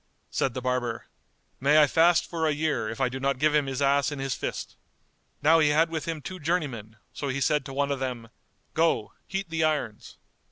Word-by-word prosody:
'" - - -44
Said 130 - 0
the 130 - -4
barber, 125 -2 -1 0.5
"May 145 +3 +5
I 150 - +7
fast 165 +3 +3
for 165 -2 -1
a - - +2
year, 150 -7 -1
if 115 - -6
I 135 - +2
do 130 +2 -5
not 135 0 0
give 150 +3 +2
him 150 -2 +2
his 135 +1 -2
ass 140 +1 +3
in 145 - -5
his 135 -1 -2
fist!" - - -5 0.7
Now 160 +2 +6
he 155 -2 +4
had 160 +3 +3
with 160 -2 -3
him 160 -3 -4
two 185 +4 -7
journeymen, 140 - -2 0.2
so 145 - -4
he 135 0 -2
said 150 +1 +2
to 135 - -7
one 140 +1 0
of 140 - -1
them 125 -3 -4 0.4
"Go, 160 -10 +1
heat 195 -3 -4
the 160 -1 0
irons." 145 -9 -2
145 Hz, 225 wpm, -27 LUFS, 130-160 Hz, 0.7 s, I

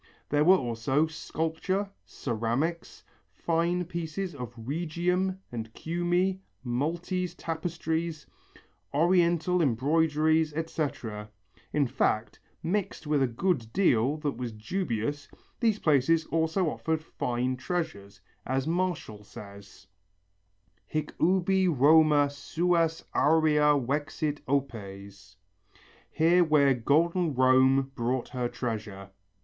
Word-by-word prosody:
There 145 +1 +3
were 185 +4 +7
also 125 +3 0
sculpture, 165 +5 -3 0.2
ceramics, 130 +8 -3 0.3
fine 170 +2 0
pieces 170 +2 -4
of 125 -4 -7
Rhegium 175 +8 -1
and 115 -2 -5
Cumæ, 175 +3 0 0.2
Maltese 170 +8 -2
tapestries, 165 -1 -3 0.7
Oriental 175 +1 +3
embroideries, 155 +3 +2
etc. 135 -10 -4 0.4
In 145 -2 +2
fact, 110 -3 -1 0.2
mixed 180 0 -2
with 150 -1 +1
a 135 - +3
good 120 -2 -1
deal 140 - +2
that 145 -5 -3
was 125 -2 -4
dubious, 120 - -3 0.3
these 225 -4 +2
places 160 0 +2
also 165 +3 +1
offered 160 -1 -2
fine 125 -3 -2
treasures, 105 - -4 0.2
as 130 +1 -1
Martial 165 - -2
says: 100 -1 -12 1.0
Hic 155 -1 -3
ubi 190 +1 +3
Roma 150 0 +5
suas 165 +2 0
aurea 150 -1 +4
vexit 145 +3 -2
opes. 100 -8 -4 0.7
(Here 175 +3 +4
where 145 -4 +4
golden 160 +6 +1
Rome 130 +1 +4
brought 125 0 -2
her 125 -1 -2
treasure.) 110 -5 -5
150 Hz, 100 wpm, -28 LUFS, 125-170 Hz, 1.0 s, were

